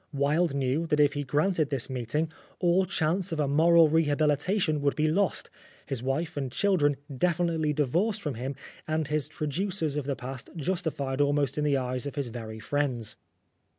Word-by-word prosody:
Wilde 145 +3 +1
knew 140 +4 0
that 150 -1 +1
if 145 -1 +5
he 145 - -2
granted 150 +3 +1
this 135 -4 -1
meeting 130 +5 -2 0.3
all 180 +1 +3
chance 180 +2 0
of 160 - -2
a 145 - +2
moral 165 +3 +6
rehabilitation 155 +2 +2
would 140 0 +1
be 155 0 +2
lost, 185 +4 0 0.3
his 135 -4 -4
wife 135 +6 -2
and 135 -3 -3
children 145 -5 +2 0.2
definitely 170 0 +1
divorced 170 - +1
from 150 - -2
him, 130 +4 -4 0.3
and 155 -2 -1
his 150 -2 0
traducers 155 +1 -2
of 145 - -2
the 140 -1 -1
past 130 -1 -7
justified 155 -5 -2
almost 145 -1 +1
in 150 - -1
the 145 -2 +2
eyes 130 +1 -2
of 140 - -6
his 140 -4 -2
very 110 -2 -7
friends. 125 -2 -1
150 Hz, 175 wpm, -28 LUFS, 135-165 Hz, 0.3 s, moral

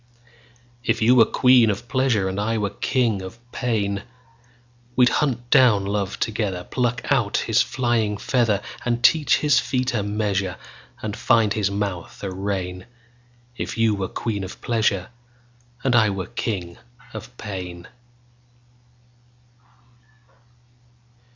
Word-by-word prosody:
If - - +1
you 120 +3 +6
were 120 -3 +7
queen 125 -3 +5
of 105 +4 -3
pleasure, 125 -7 +1
And 95 +1 -3
I 110 +2 0
were 105 -2 -1
king 115 -6 0
of 95 +5 -8
pain, 100 -5 -1 0.9
We'd 125 -1 +5
hunt 120 -4 -1
down 120 -8 +5
love 100 -1 -2
together, 105 -5 -2
Pluck 125 +2 -2
out - - +2
his - - +2
flying 115 -5 0
feather, 115 -4 +1 0.2
And 120 0 -1
teach 155 -3 +5
his 150 -3 +4
feet 125 +1 -1
a 110 - 0
measure, 100 -3 -1 0.5
And 110 -1 -3
find 115 -5 +3
his 105 -3 0
mouth 100 -4 -4
a 100 - -3
rein; 95 -1 -4 0.7
If - - -5
you 115 -1 +3
were 100 -2 -2
queen 105 -2 -3
of 95 - -8
pleasure. 110 -5 0 0.7
And 130 -2 +2
I 110 -3 +5
were 95 -2 -3
king 90 -6 -4 0.3
of - - -9
pain. 90 -4 -7
105 Hz, 130 wpm, -23 LUFS, 100-120 Hz, 0.9 s, were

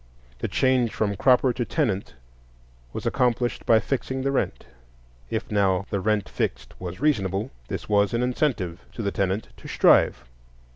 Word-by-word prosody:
The - - -2
change 130 -3 +2
from 100 -2 0
cropper 130 +3 +4
to 120 - -2
tenant 100 - -1 0.8
was - - -6
accomplished 120 0 0
by 115 - +6
fixing 130 +3 -2
the 135 - +1
rent. 135 - -1 0.6
If, - - -3
now, 100 -2 +2
the 100 - 0
rent 105 0 0
fixed - - -3
was 90 0 -6
reasonable, 110 -5 0 0.2
this - - -5
was 100 -1 +3
an 120 +1 0
incentive 120 - -1
to 115 - -5
the 100 - 0
tenant 100 +2 -1
to - - -11
strive. 65 - +4
110 Hz, 155 wpm, -25 LUFS, 100-125 Hz, 0.8 s, by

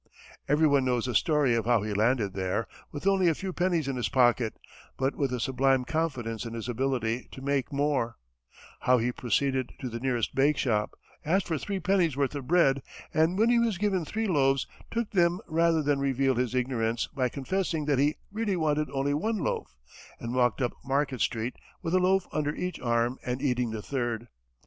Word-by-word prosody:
Everyone 145 -2 +4
knows 125 -2 +1
the 125 - -2
story 145 +1 +3
of 115 -2 0
how 120 -4 +3
he 105 -1 -2
landed 110 -1 +1
there, 95 +2 -1 0.2
with 145 +2 -7
only 195 -2 +4
a 165 - +3
few 190 +1 -5
pennies 175 -5 0
in 135 -2 -2
his 120 -4 -1
pocket, 120 -4 +3 0.4
but 135 +1 0
with 140 -3 -1
a 125 - -2
sublime 130 +1 +2
confidence 130 -9 -2
in 115 -1 -6
his 115 0 -5
ability 120 -1 -1
to - - -9
make 140 0 0
more; 140 -4 0 0.6
how 125 0 +4
he 120 +1 0
proceeded 130 +2 0
to 130 - -4
the 115 0 -5
nearest 125 -3 -1
bakeshop, 135 -6 +1 0.3
asked 185 +5 +1
for 160 -3 -1
three 200 +4 -3
pennies' 175 -5 +1
worth 140 -1 +1
of 140 -3 -5
bread, 140 -6 +4 0.3
and 160 +4 +2
when 225 +3 +4
he 240 - +4
was 230 -5 +1
given 190 -2 0
three 220 +7 -2
loaves, 135 -6 +2 0.2
took 230 -1 -2
them 175 -3 +3
rather 165 0 +2
than 145 -1 +1
reveal 135 -1 +2
his 125 0 -1
ignorance 120 -2 0
by 130 -3 0
confessing 160 +3 -2
that 145 -3 +2
he 145 +2 +3 0.2
really 210 -2 -1
wanted 150 -2 0
only 140 +1 0
one 215 +10 0
loaf, 155 - -3 0.4
and 120 +1 -4
walked 125 -1 +2
up 120 - 0
Market 135 -2 0
street, 115 +2 -1 0.3
with 165 - -2
a 185 - +5
loaf 185 0 +3
under 150 -1 -1
each 180 0 -4
arm, 120 +1 0
and 125 +1 -2
eating 125 -4 0
the 110 -1 -5
third. 120 -4 -3
135 Hz, 195 wpm, -28 LUFS, 120-160 Hz, 0.6 s, a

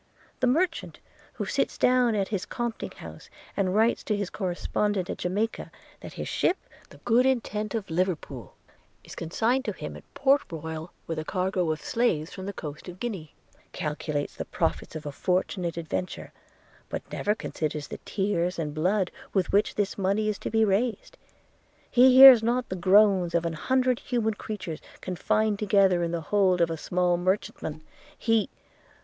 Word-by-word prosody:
The 255 - +2
merchant, 330 +6 0 0.4
who - - -4
sits - - -1
down 250 -3 +3
in 200 -2 +1
his 195 -2 -3
compting 240 -2 -3
house, - - -11 0.3
and 190 -1 0
writes 225 +2 +3
to 210 - 0
his 200 -3 -3
correspondent 190 +1 -1
at - - -6
Jamaica, 205 +6 -2 0.3
that - - -10
his - - -5
ship, 365 - +1 0.3
the - - -15
Good 245 +2 +4
Intent 220 -4 -1
of 220 -3 -3
Liverpool, 160 - -3 0.5
is - - -11
consigned 230 +10 0
to - - -2
him - - -7
at - - -14
Port 280 +1 +4
Royal 160 +1 -6
with 165 -1 -3
a - - -3
cargo 185 -1 0
of 155 - -4
slaves 175 -10 0
from 190 0 -7
the - - -2
coast 150 -2 -8
of 180 +1 -10
Guinea, 190 -11 -5 0.4
calculates 150 -1 -3
the - - -5
profits - - -2
of 155 -1 -6
a 145 - -3
fortunate 180 +1 -1
adventure, 170 +2 -4 0.6
but - - -4
never 210 +1 0
considers 150 -7 -4
the - - -7
tears 190 -3 -1
and 150 -3 -3
blood 180 +4 +1 0.2
with 190 -2 +1
which 205 +2 +2
this 205 -1 -1
money 200 +3 +1
is 210 - -3
to - - -4
be 220 0 +3
raised. 215 +4 -1 0.8
He 255 +1 +6
hears 260 -3 +11
not 240 +2 0
the 185 - -3
groans 185 -1 +4
of 170 0 +1
an 165 - -1
hundred 255 +8 +1
human 230 -3 -1
creatures 205 -7 -6 0.2
confined 205 +3 0
together 195 -3 +3
in 170 - 0
the 170 -1 -2
hold 190 -3 +3
of 170 -1 +2
a - - -1
small 175 +2 +1
merchantman 175 -4 -2 0.2
– - - -24
he 225 -3 +1
195 Hz, 175 wpm, -27 LUFS, 170-220 Hz, 0.8 s, hears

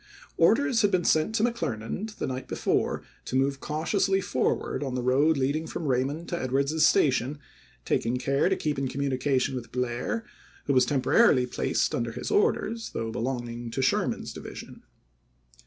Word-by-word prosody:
Orders 230 - +4
had 205 - +4
been 180 -3 +1
sent 160 +8 +2
to 220 - +2
McClernand 185 - -2
the - - -3
night 130 0 -4
before - - 0 0.2
to - - -4
move 135 +1 +1
cautiously 190 +7 0
forward 130 -6 -1
on 130 -2 -3
the 125 - -2
road 140 +5 +3
leading 145 +4 0
from 170 - -5
Eaymond 140 +5 -1
to 170 - -2
Edwards's 140 +5 +2
Station, 135 -1 +2 0.5
taking 120 +2 0
care 140 +6 +1
to 190 - +2
keep 150 -5 -2
in 135 - -1
communication 135 0 0
with 120 -3 -6
Blair, 125 - -2 0.4
who 140 - +1
was 130 -1 +4
tem 135 -2 0
porarily 140 - +5
placed 125 - -1
under 115 -1 -2
his 125 - -5
orders, 225 +2 +1
though 115 0 -2
belonging 120 -1 -4
to 130 +3 -2
Sherman's - - 0
division. - - -9
140 Hz, 165 wpm, -27 LUFS, 125-165 Hz, 0.5 s, porarily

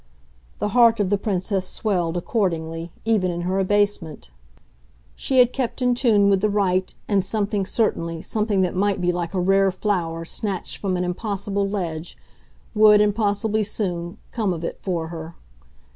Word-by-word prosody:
The - - -1
heart 230 0 +5
of 200 -2 0
the 205 - +3
Princess 190 -1 -1
swelled, 180 -5 -1
accordingly, 170 -4 -2
even 215 -5 +2
in 175 0 -3
her 185 +2 -1
abasement; 190 - 0 0.8
she 265 - -1
had 250 -1 +5
kept 255 -2 -2
in 250 -1 +2
tune 225 -5 +3
with 195 -1 +3
the 215 - +2
right, 190 -2 +1 0.2
and 200 -3 +2
something, 200 -1 -1
certainly, 170 -7 -1
something 210 -3 0
that 180 -2 0
might 200 +1 +1
be 180 0 +1
like 175 +1 -4
a - - +1
rare 195 +1 +3
flower 175 -4 -2
snatched 195 +1 -4
from 190 -3 -1
an 180 - -1
impossible 200 +1 -2
ledge, 170 -5 -4 0.6
would, 210 -1 +6
and 210 0 +3
possibly 215 0 0
soon, 180 -3 -3
come 210 -6 0
of 165 -1 -6
it - - -4
for 170 -4 -3
her. 165 0 -8
195 Hz, 165 wpm, -23 LUFS, 175-210 Hz, 0.8 s, would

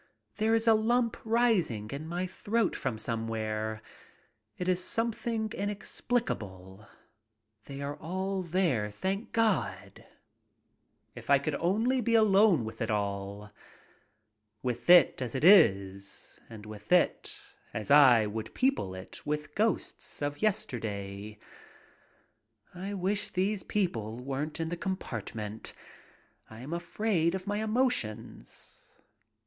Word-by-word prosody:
There 220 +1 +3
is 225 +1 0
a 225 - +8
lump 230 +2 +2
rising 220 - +1
in 145 +3 -5
my 175 +2 -2
throat 205 +3 -1
from 110 - -3
somewhere. 110 -1 -3 0.7
It 180 - -3
is 180 0 +1
something 230 0 -1
inex 205 0 -5
plicable. 100 - -3 0.8
They 140 0 -7
are 185 +7 -3
there, 165 - 0
thank 190 - -3
God! 100 - 0 1.1
If - - -11
I 140 - +7
could 145 +2 -2
only 220 - +1
be 230 0 +2
alone 205 - +5
with 110 +2 -8
it 115 - -1
all. 100 0 -3 1.1
With 120 +2 -3
it 175 -7 +7
as 125 -1 -3
it 130 - -2
is, 100 - +4
and 110 -2 -10
with 105 - -11
it 180 -1 +2 0.3
as 110 +5 -4
I 130 -6 +7
would 110 +1 -5
people 260 - +1
it 95 +1 -9
with 150 0 -3
ghosts 220 +2 -2
of 145 0 -3
yesterday. 105 - -3 1.4
I 195 +3 -5
wish 200 +2 -1
these 195 +2 0
people 115 - -2
weren't 140 +5 -4
in 165 0 -2
the 175 - -3
compartment. 110 - -5 0.7
I 110 +1 -11
am 140 +6 -6
afraid 170 0 0
of 190 -1 -5
my 205 0 -1
emotions. 220 - -3
155 Hz, 120 wpm, -30 LUFS, -, 1.4 s, a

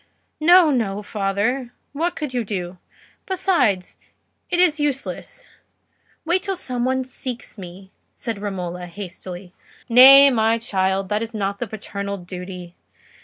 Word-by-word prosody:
"No, 340 0 +6
no, 210 -6 -1
father; 210 +5 -2 0.2
what 335 +5 -1
could 300 -4 -5
you 245 -2 0
do? 185 -4 -5 0.5
besides, 285 - 0 0.5
it 355 - 0
is 330 -4 +3
useless: 295 - -4 0.8
wait 350 +3 +1
till 390 0 -3
some 250 -8 -3
one 260 0 0
seeks 255 -1 -6
me," 190 -1 -11 0.2
said 225 -4 -5
Romola, 180 -3 -5
hastily. 180 0 -8 0.4
"Nay, 275 +3 +9
my 225 -1 +2
child, 190 -4 -1
that 210 +1 0
is 230 0 -5
not 200 -1 -2
the 240 - -3
paternal 200 -1 -5
duty. 180 -1 -9
220 Hz, 130 wpm, -21 LUFS, 190-270 Hz, 0.8 s, Nay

